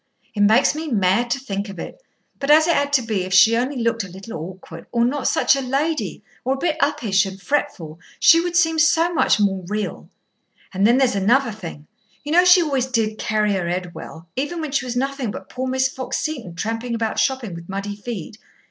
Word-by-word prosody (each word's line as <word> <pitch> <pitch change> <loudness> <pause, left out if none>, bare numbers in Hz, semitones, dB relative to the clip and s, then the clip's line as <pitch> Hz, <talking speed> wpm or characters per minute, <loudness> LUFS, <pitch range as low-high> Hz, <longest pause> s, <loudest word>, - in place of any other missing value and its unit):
It 210 - -6
makes 215 +6 +4
me 315 +2 -5
mad 215 -1 +1
to 260 +3 0
think 200 -5 -4
of 195 - -9
it. - - -8 0.4
But 275 - -3
as 310 +1 +7
it 340 - +3
had 285 -2 0
to 265 -3 +3
be, 215 -4 -1
if 185 0 -1
she 225 +5 +6
only 255 +4 -1
looked 230 -2 0
a - - -8
little 190 +5 -10
awkward, 165 0 -9
or 235 -1 +2
not 270 +2 -1
such - - +3
a 275 - -2
lady, 285 +5 -2 0.2
or 265 +1 0
a - - -7
bit 315 +2 -1
uppish 205 -8 +2
and 190 0 -8
fretful, 185 - -3 0.2
she 330 - +7
would 350 0 -3
seem 325 -2 +3
so 330 +2 +3
much 300 - +3
more 195 -2 +1
real. 210 +1 -4 0.6
And 195 +2 +3
then 240 +2 +4
there's 265 -2 +3
another 235 +6 +2
thing. 170 -8 -9 0.4
You 295 - -5
know 355 +3 +5
she 360 0 +7
always 270 -5 -1
did 220 -4 -1
carry 210 -1 0
her 180 -3 -2
head 180 0 -3
well, 165 +1 -10
even 290 +6 -3
when 310 -3 -4
she 270 -2 0
was 245 -1 -4
nothing 270 -2 -2
but - - -8
poor 260 +1 -4
Miss 260 0 +1
Fox 265 -1 -4
Seton 255 - -4
tramping 225 +4 -3
about 225 -1 -2
shopping 260 -8 -1
with 170 +1 -10
muddy 200 +1 -4
feet. 210 -1 -7
235 Hz, 220 wpm, -21 LUFS, 195-275 Hz, 0.6 s, as